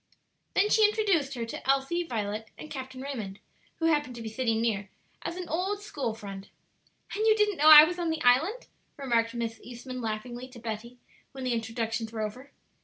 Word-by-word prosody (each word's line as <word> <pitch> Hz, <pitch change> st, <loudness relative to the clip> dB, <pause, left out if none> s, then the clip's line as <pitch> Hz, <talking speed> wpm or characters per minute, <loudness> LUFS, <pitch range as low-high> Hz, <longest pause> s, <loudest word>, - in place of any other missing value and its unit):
Then 415 Hz, +2 st, +3 dB
she 440 Hz, -, +5 dB
introduced 395 Hz, -10 st, +2 dB
her 235 Hz, -2 st, -3 dB
to 230 Hz, +3 st, -7 dB
Elsie, 275 Hz, +6 st, +2 dB
Violet, 220 Hz, -7 st, -3 dB
and 310 Hz, -, -10 dB
Captain 260 Hz, -1 st, -6 dB
Raymond, 220 Hz, -9 st, -5 dB, 0.4 s
who 325 Hz, -, -1 dB
happened 295 Hz, -6 st, +1 dB
to 235 Hz, -, -7 dB
be 220 Hz, -, -4 dB
sitting 225 Hz, -1 st, 0 dB
near, 205 Hz, -4 st, -1 dB, 0.3 s
as -, -, -4 dB
an 365 Hz, -1 st, -5 dB
old 385 Hz, +5 st, -2 dB
school 270 Hz, -, -3 dB
friend. 200 Hz, -2 st, -8 dB, 0.7 s
"And 430 Hz, +2 st, +1 dB
you 435 Hz, -, +6 dB
didn't 420 Hz, -3 st, +2 dB
know 305 Hz, +2 st, +6 dB
I 305 Hz, -1 st, +13 dB
was 355 Hz, +3 st, -1 dB
on 340 Hz, -1 st, 0 dB
the 320 Hz, -1 st, -2 dB
island?" 320 Hz, -, +3 dB, 0.3 s
remarked 235 Hz, -4 st, 0 dB
Miss 230 Hz, -1 st, -3 dB
Eastman 250 Hz, +1 st, -7 dB
laughingly 240 Hz, +3 st, -4 dB
to 255 Hz, -2 st, -13 dB
Betty, 230 Hz, +2 st, -6 dB, 0.4 s
when 265 Hz, -1 st, -7 dB
the 250 Hz, -1 st, 0 dB
introductions 225 Hz, 0 st, -2 dB
were 225 Hz, -1 st, -4 dB
over. 250 Hz, +7 st, -6 dB
255 Hz, 190 wpm, -28 LUFS, 225-320 Hz, 0.7 s, I